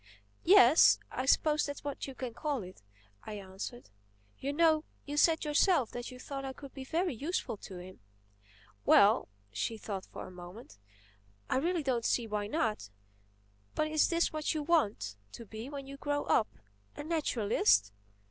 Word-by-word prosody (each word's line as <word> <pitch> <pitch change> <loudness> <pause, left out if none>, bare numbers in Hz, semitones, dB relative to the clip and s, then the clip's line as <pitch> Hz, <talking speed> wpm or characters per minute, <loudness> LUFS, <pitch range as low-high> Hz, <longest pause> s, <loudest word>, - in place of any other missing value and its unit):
"Yes. 325 -5 +7
I 255 - -3
suppose 300 +2 +3
that's 285 - -6
what 285 -1 -4
you 270 - -8
call 260 +1 -3
it," 185 - -12 0.4
I 215 - -7
answered. 195 - -8 0.5
"You 275 - -2
know 315 0 +3 0.2
you 290 - -5
said 320 +1 +3
yourself 300 - +3
that 245 0 -6
you 255 - -10
thought 275 +2 -6
I 265 0 -4
could 275 0 -12
be 270 - -7
very 335 +4 -1
useful 290 +2 -3
to 190 -2 -10
him." 180 -2 -11 0.8
"Well"—she 105 - +2
thought 200 -3 -6
a 185 - -8
moment—"I 105 - -9
really 335 +3 0
don't 250 -4 0
see 235 +1 +1
why 210 -1 -2
not. 215 - -1 0.9
But 310 - 0
is 310 -1 +3
this 335 -2 +1
what 310 +1 -1
you 305 - -1
want 215 - +1 0.2
to 235 - -9
be 220 +4 -8
when 280 -2 -6
you 275 +1 -9
grow 290 0 -1
up, 215 - +2 0.5
a - - -6
naturalist?" 210 - +2
255 Hz, 155 wpm, -32 LUFS, 195-300 Hz, 0.9 s, Yes